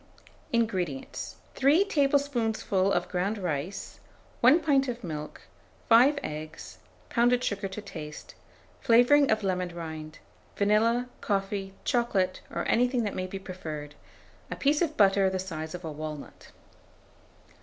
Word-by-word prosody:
1480. 195 Hz, -, 0 dB
INGREDIENTS. 135 Hz, -, -7 dB, 0.2 s
3 295 Hz, +9 st, +4 dB
tablespoonfuls 275 Hz, -, +1 dB
of -, -, 0 dB
ground 195 Hz, +4 st, -1 dB
rice, 175 Hz, 0 st, -4 dB, 0.4 s
1 260 Hz, +8 st, +6 dB
pint 275 Hz, -4 st, +2 dB
of 245 Hz, -1 st, -4 dB
milk, 150 Hz, -3 st, -6 dB, 0.5 s
5 250 Hz, +6 st, +6 dB
eggs, 155 Hz, +1 st, -7 dB, 0.3 s
pounded 245 Hz, +1 st, +3 dB
sugar 200 Hz, -3 st, -1 dB
to 195 Hz, +2 st, -7 dB
taste, 155 Hz, -6 st, -9 dB, 0.5 s
flavouring 245 Hz, +5 st, +5 dB
of 215 Hz, -1 st, +2 dB
lemon 185 Hz, -2 st, -1 dB
rind, 160 Hz, -2 st, -7 dB, 0.4 s
vanilla, 225 Hz, +4 st, +2 dB
coffee, 195 Hz, -1 st, -2 dB
chocolate, 200 Hz, -7 st, +1 dB
or -, -, -3 dB
anything 245 Hz, 0 st, +2 dB
that 205 Hz, -, -2 dB
may 185 Hz, 0 st, -3 dB
be 195 Hz, -, -6 dB
preferred, 160 Hz, -6 st, -7 dB, 0.6 s
a -, -, -4 dB
piece 290 Hz, +3 st, +2 dB
of 315 Hz, -3 st, 0 dB
butter 195 Hz, -1 st, +5 dB
the 190 Hz, -, -2 dB
size 160 Hz, -3 st, -5 dB
of 180 Hz, -1 st, -8 dB
a 160 Hz, -, -4 dB
walnut. 150 Hz, -1 st, -8 dB
200 Hz, 135 wpm, -28 LUFS, 175-245 Hz, 0.6 s, 1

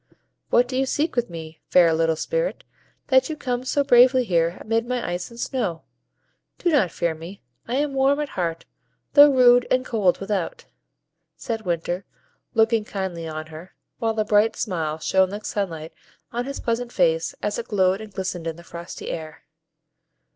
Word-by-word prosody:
"What 245 Hz, +1 st, +4 dB
do 255 Hz, -, -5 dB
you 265 Hz, +1 st, +1 dB
seek 305 Hz, +3 st, -1 dB
with 240 Hz, -4 st, 0 dB
me, 160 Hz, -1 st, -9 dB
fair 170 Hz, -2 st, +5 dB
little 165 Hz, 0 st, +2 dB
Spirit, -, -, -2 dB, 0.5 s
that 260 Hz, +1 st, +4 dB
you 310 Hz, -, -4 dB
come 250 Hz, -3 st, -2 dB
so 280 Hz, +2 st, +1 dB
bravely 255 Hz, -1 st, +6 dB
here 170 Hz, -5 st, +1 dB
amid 225 Hz, +1 st, -1 dB
my 250 Hz, -1 st, -2 dB
ice 175 Hz, +1 st, -3 dB
and 235 Hz, 0 st, -13 dB
snow? 210 Hz, -, -2 dB, 0.7 s
Do 350 Hz, -, +1 dB
not 260 Hz, -, +3 dB
fear 170 Hz, 0 st, -1 dB
me; 165 Hz, +3 st, -10 dB, 0.2 s
I 240 Hz, -, -2 dB
am 285 Hz, 0 st, 0 dB
warm 270 Hz, +2 st, +3 dB
at 295 Hz, -1 st, -2 dB
heart, 165 Hz, -5 st, -3 dB, 0.5 s
though 290 Hz, 0 st, +9 dB
rude 245 Hz, -2 st, +5 dB
and 255 Hz, 0 st, +2 dB
cold 205 Hz, -7 st, +1 dB
without," 210 Hz, -, -3 dB, 0.7 s
said 225 Hz, -5 st, -4 dB
Winter, 175 Hz, +2 st, -1 dB, 0.5 s
looking 225 Hz, 0 st, +3 dB
kindly 190 Hz, -5 st, -4 dB
on 155 Hz, 0 st, -5 dB
her, 165 Hz, +4 st, -11 dB, 0.2 s
while 225 Hz, -1 st, -1 dB
a 215 Hz, -, +1 dB
bright 210 Hz, +1 st, +3 dB
smile 160 Hz, -7 st, -2 dB
shone 190 Hz, +3 st, +2 dB
like 205 Hz, +2 st, -7 dB
sunlight 165 Hz, -6 st, -3 dB, 0.4 s
on 240 Hz, +1 st, -2 dB
his 275 Hz, +1 st, -5 dB
pleasant 235 Hz, +1 st, -2 dB
face, -, -, +1 dB
as -, -, -1 dB
it 475 Hz, -, -6 dB
glowed 190 Hz, -1 st, +2 dB
and 215 Hz, -1 st, -9 dB
glistened 185 Hz, -3 st, -4 dB
in 165 Hz, -, -3 dB
the 170 Hz, -, -13 dB
frosty 170 Hz, 0 st, -7 dB
air. 155 Hz, -2 st, -7 dB
215 Hz, 175 wpm, -23 LUFS, 170-255 Hz, 0.7 s, though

